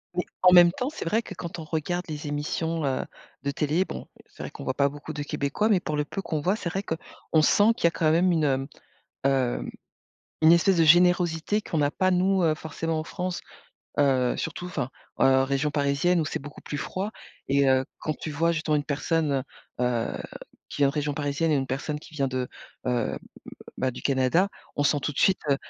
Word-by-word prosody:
Mais, 180 - +1 0.2
en 180 - +7
même 175 -1 +8
temps, 250 +8 -3
c'est 310 - -7
vrai 220 +7 +1
que, 195 - -9
quand 170 0 -6
on - - -5
regarde 165 +3 -2
les 150 -1 -5
émissions, 155 +3 -2
heu, 135 -1 0 0.4
de 140 - 0
télé, 155 +6 +1
bon, - - -7 0.2
c'est - - -13
vrai - - -5
qu'on - - -10
voit 130 - -1
pas 140 +1 +2
beaucoup 145 +2 -8
de 150 - -4
Québécois, 145 +10 -1
mais 200 - +4
pour 155 -4 -3
le 150 - +1
peu 195 - -5
qu'on 155 -5 -3
voit, 185 +7 +2
c'est 175 -6 -4
vrai 195 +3 -3
qu'on 160 -2 -2
sent 205 +8 +5
qu'il 225 - -2
y - - +9
a - - +2
quand 155 -2 +2
même 175 +3 +4
une, 150 -5 +2
mmh, - - -9 0.6
heu, 135 -3 +1 0.8
une 160 +1 +8
espèce 175 +2 +4
de 165 - +4
générosité 175 +3 +4
qu'on 160 - -2
n'a 145 -1 +2
pas 185 +4 +1
nous, 185 +1 +2
heu, 160 -2 +3
forcément, 160 +1 -3
en 155 - -3
France. 180 +1 -4 0.6
Heu, 130 -3 +3
surtout, 180 - -4
enfin, 130 -8 -3 0.3
heu, 130 0 +5
région 140 +2 0
parisienne, 145 +5 +2
où - - 0
c'est - - -3
beaucoup 145 +1 -10
plus 145 - -5
froid, 185 +8 -3 0.4
et 140 0 +3
heu, 130 0 +3 0.2
quand 155 - -2
tu 155 - -5
vois? 165 +3 +2
Justement 155 -1 0
une 145 - 0
personne, 145 -1 0 0.4
heu - - +2
heu, 120 -2 -1 0.5
qui - - -8
vient 140 - +6
de - - -1
région 150 -1 -1
parisienne 150 +2 0
et - - +4
une 135 - -1
personne 150 +3 -3
qui 155 - -15
vient 140 -2 0
de, 130 -1 -2 0.4
heu, 125 -2 0 0.6
bah, 130 0 0
du - - -9
Canada, 135 +8 +2 0.3
on 145 - 0
sent 145 +1 +3
tout - - -1
de - - -8
suite, 190 - +4
heu 140 - +4
155 Hz, 225 wpm, -26 LUFS, 140-175 Hz, 0.8 s, y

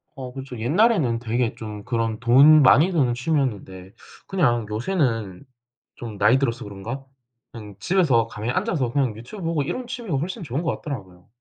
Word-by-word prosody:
어 130 -2 -7
그쵸. 130 -2 -8
옛날에는 150 - +2
되게 120 0 -1
좀 105 -2 -8
그런 115 -2 -2
돈 140 +6 +7
많이 150 +8 +5
드는 130 -8 +2
취미였는데 115 - -3 0.3
그냥 120 - +1
요새는 115 - -1 0.5
좀 110 -4 -8
나이 105 +6 +4
들어서 120 -3 -2
그런가 105 +7 -7 0.5
그냥 105 -4 -11
집에서 135 - +2
가만히 115 +2 -4
앉아서 160 - -1
그냥 130 -7 0
유튜브 150 - -10
보고 165 -3 0
이런 250 - -4
취미가 235 - -4
훨씬 180 - -4
좋은 140 +2 -3
것 165 - -1
같더라고요. 95 - -8
125 Hz, 365 characters per minute, -23 LUFS, 110-155 Hz, 0.5 s, 돈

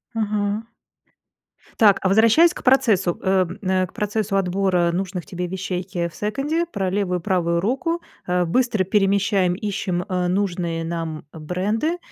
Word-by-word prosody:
Ага. 210 0 -1 1.1
Так, 205 -4 +6
а - - +1
возвращаясь 230 - +5
к - - -10
процессу, 225 -10 +3
э, 190 0 +2
м, 180 +3 -8
э, 185 -1 +1
к - - -21
процессу 210 -1 -1
отбора 185 -2 +1
нужных 185 -1 -3
тебе 180 -3 -4
вещей, 185 0 -4
е 170 -1 -1
в - - -18
секонде, 280 +10 -1
про 195 - -3
левую 185 -2 -1
и - - -13
правую 170 -4 +1
руку. 270 - -1 0.3
Э, 180 0 +1
быстро 235 +1 +1
перемещаем, 195 -1 +2
ищем, 190 -3 -2
э, 180 -2 -1
нужные 175 -3 -1
нам 165 -2 -4
бренды. 195 - -2
195 Hz, 155 wpm, -22 LUFS, 180-215 Hz, 1.1 s, Так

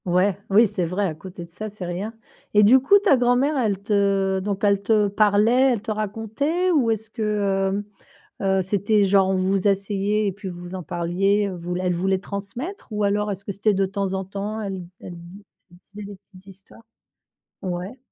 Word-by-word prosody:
Ouais, 180 +2 +2
oui, 210 +4 +6
c'est 195 -4 -2
vrai 190 +4 -1
à 170 - -1
côté 175 +2 -9
de 170 - -22
ça 215 +5 -6
c'est 200 -3 -8
rien. 180 +5 -4 0.4
Et 210 - +7
du 245 +6 +7
coup 275 +10 +5
ta 300 -10 +5
grand-mère 250 +4 +2
elle 220 -7 +1
te 200 -2 +1
donc 200 +1 -3
elle 200 -1 +3
te 210 0 +3
parlait, 215 +6 +4
elle 225 - -3
te 225 - -3
racontait 225 - -1
ou 275 -9 +3
est-ce 220 0 -2
que, 225 - -7 0.6
heu 205 - -5 0.6
heu, 190 0 +2
c'était 205 +2 +2
genre 195 0 +3
vous 190 +1 +1
asseyez 200 +1 0
et - - 0
puis 195 0 -7
vous 175 +1 -8
en 185 - -6
parliez, 190 +4 0
ou 185 - -6
vous 175 +1 -4
elle 180 -1 0
voulait 190 +2 0
transmettre? 210 - -6
Ou 210 -1 -1
alors 205 +1 +1
est-ce 195 0 -6
que 200 - -4
c'était 205 +2 +1
de 195 0 +1
temps 195 0 -2
en 190 0 -2
temps 200 +3 -5
elle 195 -3 -4
d - - -13
elle 175 - -9
di 175 +4 -12 0.3
elle - - -16 0.2
disait 210 - -7
des - - -9 0.2
petites 185 -1 -16
histoires? 195 +4 -16 0.8
Ouais. 185 +6 -4
200 Hz, 205 wpm, -23 LUFS, 190-215 Hz, 0.8 s, Et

